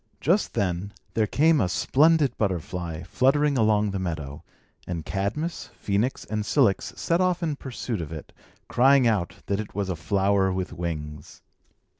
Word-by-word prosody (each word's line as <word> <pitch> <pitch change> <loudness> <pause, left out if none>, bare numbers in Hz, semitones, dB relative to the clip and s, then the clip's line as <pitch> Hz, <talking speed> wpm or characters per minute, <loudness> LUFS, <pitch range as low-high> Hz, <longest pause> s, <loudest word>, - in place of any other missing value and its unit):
Just 180 +8 +1
then, 100 -1 -1 0.2
there 110 -2 +1
came 155 +3 +3
a 90 - +1
splendid 150 - +3
butterfly, 90 -4 -3
fluttering 140 - +2
along 105 -3 +2
the 95 - -3
meadow; 80 -6 -5 0.4
and 85 -4 -4
Cadmus, 150 - -3
Phœnix, 105 +6 -1
and 105 -1 -2
Cilix 110 -3 +2
set 170 +2 +1
off 180 -1 +1
in 155 -3 0
pursuit 125 -6 -5
of 80 - -7
it, 80 -2 -8 0.3
crying 135 +1 +4
out 105 -7 +1
that 100 0 -1
it 110 - -6
was 100 -2 -2
a 90 - -1
flower 95 +4 +1
with 95 0 -3
wings. 75 -3 -6
100 Hz, 155 wpm, -25 LUFS, 90-135 Hz, 0.4 s, crying